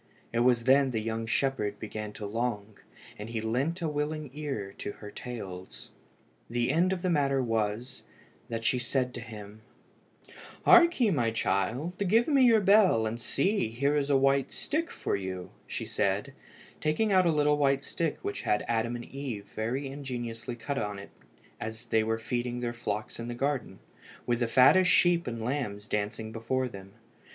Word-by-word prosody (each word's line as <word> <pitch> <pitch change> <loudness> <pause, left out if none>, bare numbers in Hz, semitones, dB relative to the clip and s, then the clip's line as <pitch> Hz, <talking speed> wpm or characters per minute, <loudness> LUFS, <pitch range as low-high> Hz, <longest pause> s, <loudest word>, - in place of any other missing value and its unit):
It 115 - +1
was 120 -1 +3
then 135 +2 +5
the 115 -3 -1
young 115 +1 -3
shepherd 110 -5 0
began 105 -1 -5
to 105 - -6
long, 110 -1 -3 0.4
and 105 +2 -6
he 115 -1 -2
lent 135 +11 -1
a - - +1
willing 150 -1 -3
ear 135 -10 -4
to - - -4
her 105 -1 -10
tales. 95 -8 -8 0.6
The 120 +1 +1
end 175 +5 +3
of 185 -2 -2
the 185 - +1
matter 140 -3 +2
was, 115 0 -1 0.5
that 115 -1 -4
she 125 +3 +2
said 125 +1 -1
to 120 - -6
him 110 -2 -10 1.0
"Hark 345 -3 +7
ye, 230 -5 +4
my 120 -9 +2
child, 125 - -1
give 215 +4 +3
me 285 -3 +4
your 230 -4 +6
bell; 195 - +5
and 115 +2 -3
see, 140 - 0
here 140 +6 +1
is 145 -1 0
a 140 - +5
white 135 0 +2
stick 320 +3 -2
for - - -2
you," 95 -2 -5 0.2
said - - -1
she, - - -13 0.5
taking 155 +8 +1
out 185 -2 +5
a - - +4
little 150 -1 +2
white 140 -1 +2
stick 165 -2 -2
which - - -3
had 105 - 0
Adam 115 +1 0
and 120 - -6
Eve 130 -7 -6
very 120 +6 -2
ingeniously 125 -4 -5
cut 135 +4 -3
upon 105 -1 -3
it 100 - -10 0.5
as 110 +2 -6
they 110 -1 +2
were 110 0 0
feeding 120 +2 -3
their 120 -1 -2
flocks 110 -3 -4
in 115 - -5
the 120 - -4
Garden, 135 -6 -2 0.5
with 120 -1 +1
the 120 - +1
fattest 160 +10 +6
sheep 175 -1 +4
and 115 -2 -4
lambs 115 -6 -3
dancing 105 +2 -2
before 120 +4 -1
them. 100 -4 -11
120 Hz, 180 wpm, -29 LUFS, 110-145 Hz, 1.0 s, Hark